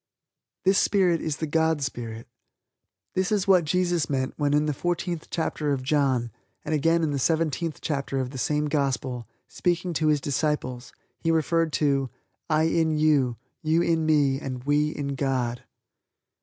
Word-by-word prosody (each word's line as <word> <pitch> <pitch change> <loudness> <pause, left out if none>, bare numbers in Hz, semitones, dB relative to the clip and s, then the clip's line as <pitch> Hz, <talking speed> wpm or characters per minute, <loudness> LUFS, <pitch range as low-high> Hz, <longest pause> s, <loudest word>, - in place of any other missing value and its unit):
This 190 +1 +5
Spirit 180 -5 +2
is 155 -2 -2
the 160 - -2
God 160 -1 +1
Spirit. 115 -3 -5 0.9
This 185 +1 0
is 205 -2 +1
what 185 -4 +5
Jesus 175 0 +1
meant 130 -2 -1
when 145 -2 0
in 150 +1 +2
the 150 - 0
fourteenth 175 +1 -2
chapter 155 -3 -1
of 130 -2 -3
John 130 -4 +1 0.3
and - - -2
again 165 +3 +2
in 155 - +1
the 140 - -1
seventeenth 160 +2 0
chapter 140 -2 -2
of 130 -1 -3
the 135 - -6
same 150 +3 0
Gospel, 135 -5 -1 0.2
speaking 175 0 -1
to 155 0 +1
His 150 -1 +3
Disciples 140 -3 -2 0.3
He 165 - -1
referred 165 0 +2
to 140 -3 +1 0.4
"I 155 0 +3
in 160 -1 +2
you, 145 -6 +2 0.2
you 160 +2 +2
in 165 -2 +1
Me 145 -3 +3
and 130 -3 -5
We 145 +2 +2
in 145 -2 -4
God." 130 -3 -1
150 Hz, 165 wpm, -26 LUFS, 135-165 Hz, 0.9 s, This